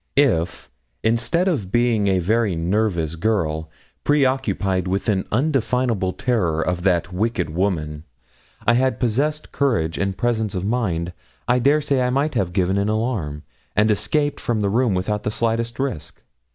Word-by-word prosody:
If, 105 - +2 0.4
instead 120 +11 +1
of 110 - -1
being 120 -3 +2
a 95 -1 +3
very 105 +2 +1
nervous 85 -2 0
girl, 80 -5 -1 0.3
preoccupied 125 - +1
with 95 +4 -1
an 100 -4 +1
undefinable 125 -6 +1
terror 95 -10 0
of 90 +1 -1
that 90 0 +1
wicked 95 -4 -1
woman, 80 -4 -2 0.6
I 120 - +5
had 130 +2 +1
possessed 140 +6 0
courage 110 - 0
and 100 -1 -1
presence 110 -4 0
of 90 +1 -2
mind, 90 -7 -1 0.3
I 125 +1 +3
dare 145 +5 +3
say 140 -2 +1
I 125 - +1
might 140 +4 0
have 90 -3 0
given 95 +2 +1
an 100 +1 0
alarm, 110 - -2 0.3
and 105 +1 +4
escaped 145 +7 0
from 115 -3 -1
the 100 - +1
room 115 -2 +2
without 105 +3 -1
the 105 - -2
slightest 115 +1 -1
risk. 135 - -4
105 Hz, 155 wpm, -22 LUFS, 90-125 Hz, 0.6 s, I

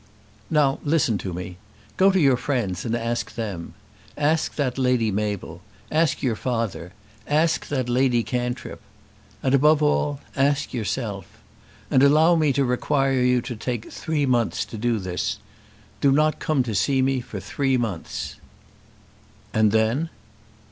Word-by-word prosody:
"Now 145 -3 +2
listen 145 - +1
to 95 - -5
me. 90 0 -6 0.4
Go 190 +1 +5
to 190 -1 +2
your 135 -5 +5
friends 120 -9 -2
and 115 0 0
ask 115 -1 -3
them. 100 -8 -5 0.4
Ask 155 +2 +1
that 135 -3 -1
Lady 125 -4 +2
Mabel; 105 -1 -3 0.3
ask 160 0 +1
your 120 -4 +1
father; 115 -8 -3 0.3
ask 155 +2 +1
that 130 -4 -1
Lady 125 -1 +2
Cantrip. 125 0 -4 0.6
And 130 - +1
above 150 +2 +4
all, 145 -1 +1 0.2
ask 140 +1 +1
yourself. 105 -5 -3 0.6
And 130 - +4
allow 155 +5 +5
me 155 -3 +3
to 140 0 +1
require 135 +1 +1
you 125 0 +3
to 120 - -5
take 115 0 -4
three 155 -3 -1
months 120 -3 +1
to 110 - -8
do 120 0 +1
this. 90 -3 -3 0.6
Do 140 - +4
not 155 +2 +2
come 150 -5 +1
to 115 -3 -4
see 130 +8 +2
me 135 0 +1
for - - -7
three 135 -2 0
months." 105 -9 -4 1.2
"And 110 -1 +3
then?" 110 +9 +1
125 Hz, 150 wpm, -24 LUFS, 110-145 Hz, 1.2 s, Go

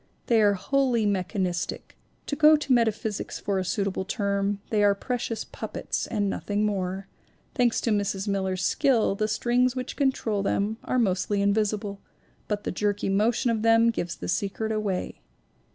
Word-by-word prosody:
They 230 -2 +3
are 205 -1 +4
wholly 250 +1 +1
mechanistic, 185 -2 -2 0.3
to 285 - -2
go 305 +1 +7
to 290 -3 +1
metaphysics 220 -3 0
for 200 -1 -1
a - - -1
suitable 190 +1 -1
term; 200 0 -1
they 210 -2 +3
are 200 -1 +4
precious 235 0 -3
puppets - - -4
and 205 -3 -1
nothing 205 +1 -1
more; 195 -1 -2 0.5
thanks 245 -3 +2
to 230 - 0
Mrs. 205 -1 -1
Miller's 190 -2 -1
skill 265 -9 +2
the 215 +2 -1
strings 245 +3 +1
which 255 0 -4
control 250 -7 0
them 200 +2 0
are 255 - -1
mostly 200 -2 +1
invisible, 200 0 0 0.5
but 205 -1 -2
the - - -2
jerky 205 +1 -1
motion 230 +5 +2
of 220 -2 -1
them 230 +1 +5
gives 175 -6 -3
the 90 - -7
secret 205 - -1
away. 205 - -2
210 Hz, 160 wpm, -26 LUFS, 195-230 Hz, 0.5 s, go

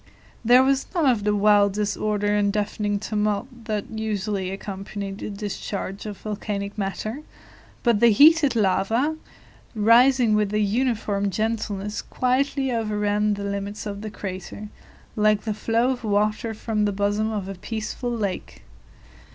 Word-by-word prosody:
There 245 +3 +6
was 270 0 +1
none 335 -4 +2
of 235 -6 +2
the 210 0 +2
wild 205 -1 +4
disorder 205 0 0
and 205 -1 +2
deafening 205 0 -1
tumult 215 +3 -2
that 215 -3 -2
usually 210 -3 -2
accompany 195 +1 -6
the 195 - -6
discharge 200 0 -5
of 205 -2 -6
volcanic 205 -1 -4
matter, 215 +6 -3 0.6
but 235 -4 +3
the 235 - +6
heated 290 +3 +6
lava, 220 +8 +1 0.6
rising 235 +2 +5
with 210 -1 +2
a - - +2
uniform 210 -2 0
gentleness, 210 0 -2
quietly 265 +1 0
overran 210 -2 0
the 200 - -6
limits 200 +1 -4
of 200 -1 -5
the 215 - -5
crater, 200 +1 -7 0.5
like 210 -1 +3
the 220 - -2
flow 230 +4 +1
of 245 -2 -5
water 215 +2 0
from 215 -1 -1
the 205 - +1
bosom 205 +2 0
of 205 -3 -3
a 195 - -4
peaceful 220 +5 -4
lake. 210 -6 -4
210 Hz, 145 wpm, -24 LUFS, 200-225 Hz, 0.6 s, There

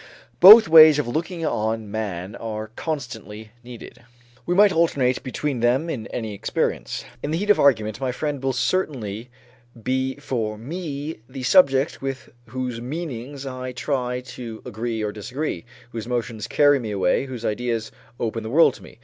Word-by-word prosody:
Both 215 +4 +11
ways 155 -2 +9
of 150 - -1
looking 165 +6 -3
on 110 -5 -2
man 100 -3 -4
are 110 -1 -6
constantly 110 -8 -6
needed. 120 -1 -11 0.5
We 175 - +1
might 205 +1 +6
alternate 140 -7 +1
between 135 0 -3
them 130 +8 +1
in 115 -7 -5
any 110 -3 -5
experience. 100 - -3 0.2
In 145 - -4
the 160 - 0
heat 205 +3 +2
of 205 - +3
argument, 110 -4 +2
my 130 -1 -1
friend 145 +1 -3
will 135 0 0
certainly 125 - -2 0.5
be 130 +2 -1
for 120 -7 -3
me 150 +3 -6
the 130 0 -7
subject 135 -2 +3
with 135 -1 -5 0.2
whose 125 -2 -4
meanings 140 -1 -6
I 130 -1 -6
try 125 -1 -2
to 120 -3 -9
agree 115 -1 -4
or 105 - -2
disagree, 120 - -5 0.3
whose 115 -1 -6
emotions 115 -3 -3
carry 145 +1 +4
me 115 -3 -5
away, 100 +6 0
whose 125 -3 -7
ideas 115 0 -2 0.3
open 115 0 -2
the 110 - -6
world 160 +7 +5
to - - -14
me. - - -14
125 Hz, 165 wpm, -23 LUFS, 110-145 Hz, 0.5 s, Both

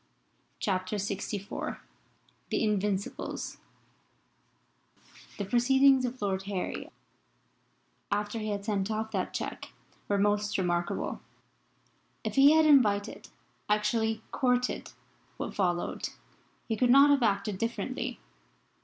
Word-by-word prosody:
CHAPTER 185 0 -1
LXIV 200 0 -4 0.7
THE - - 0
INVINCIBLES 205 -2 -2 1.8
THE 205 - -3
proceedings 265 +4 +4
of 250 +1 -4
Lord 195 -2 -1
Harry 200 -2 -4 1.2
after 205 +2 -1
he 215 0 -3
had 200 -1 -3
sent 205 -2 -1
off 220 0 -2
that - - -2
cheque - - -5 0.3
were 200 - +1
most 205 +1 +1
remarkable. 175 -2 -1 1.0
If - - -3
he 280 +2 +7
had 315 0 +5
invited 215 -9 +3 0.4
actually 220 +1 +1
courted 250 -1 0 0.5
what - - -4
followed 175 -3 -1 0.6
he 225 - 0
could 245 +2 +2
not 275 +3 +7
have 280 -2 +4
acted 205 -2 0
differently. 230 +1 -3
210 Hz, 105 wpm, -29 LUFS, 200-245 Hz, 1.8 s, he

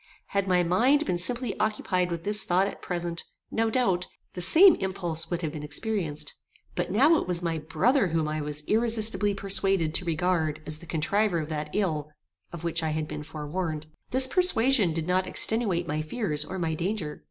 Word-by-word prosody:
Had 200 -1 -1
my 180 -1 +3
mind 250 - +2
been 175 - -1
simply 240 +7 0
occupied 205 -4 0
with 170 -1 -4
this 210 +1 +3
thought 180 +2 +2
at - - -6
present, 175 -2 -3 0.3
no 225 0 0
doubt, 195 -7 0 0.3
the 180 - -6
same 345 - +8
impulse 175 -4 -2
would 175 0 -3
have 155 - -2
been 150 -1 -7
experienced; 155 +1 -3 0.4
but - - -2
now 285 - +4
it - - -5
was 175 -1 0
my 165 -2 -1
brother 200 - +1
whom 160 -2 -1
I 155 0 -3
was 150 0 -5
irresistably 220 -1 +2
persuaded 195 -4 0
to 180 - +1
regard 160 -2 0
as 155 0 -3
the 170 - -13
contriver 180 +5 0
of 155 -1 -5
that 150 -1 -4
ill 155 -8 -1 0.4
of 170 -1 -8
which 165 -1 -1
I 160 - -1
had 155 0 -2
been - - -6
forewarned. 155 +1 -5 0.2
This 260 +1 +5
persuasion 260 - +3
did 160 0 -2
not 185 +1 0
extenuate 190 -5 +1
my 155 +1 -2
fears 155 -3 -2
or 185 +5 -7
my 165 -3 -2
danger. 170 -1 -3
180 Hz, 190 wpm, -26 LUFS, 160-210 Hz, 0.4 s, same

